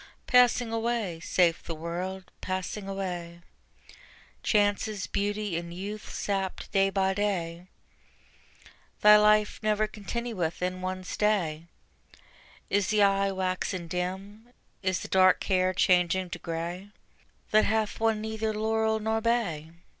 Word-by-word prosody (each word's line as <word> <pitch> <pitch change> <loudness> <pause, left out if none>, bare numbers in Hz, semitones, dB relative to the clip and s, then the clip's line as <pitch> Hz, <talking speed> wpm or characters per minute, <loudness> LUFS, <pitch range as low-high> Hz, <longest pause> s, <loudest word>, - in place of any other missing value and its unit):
Passing 245 -2 +4
away, 225 -7 -1
saith 170 0 +2
the 165 - -4
World, 180 +3 -5
passing 190 +2 -4
away: 175 -3 -5 1.0
Chances, 205 -1 +1
beauty 205 -2 -2
and 170 0 -5
youth 205 +4 -6
sapped 195 -2 -3
day 195 -1 +3
by 190 -1 +1
day: 180 -4 -2 1.3
Thy 210 0 +9
life 210 0 +3
never 215 0 +2
continueth 215 -4 -4
in 185 0 -2
one 185 0 -3
stay. 180 -6 0 1.0
Is 200 -1 +1
the 215 -1 +3
eye 195 0 +3
waxen 185 -1 -2
dim, 190 +6 -5 0.3
is 185 -2 0
the - - -6
dark 185 -1 +4
hair 185 -1 +2
changing 180 0 +2
to - - -5
gray 170 +4 -5 0.6
That 215 0 +5
hath 220 0 0
won 225 -1 +1
neither 220 0 -2
laurel 220 0 +1
nor 220 +1 -1
bay? 210 -10 0
195 Hz, 125 wpm, -28 LUFS, 180-215 Hz, 1.3 s, Thy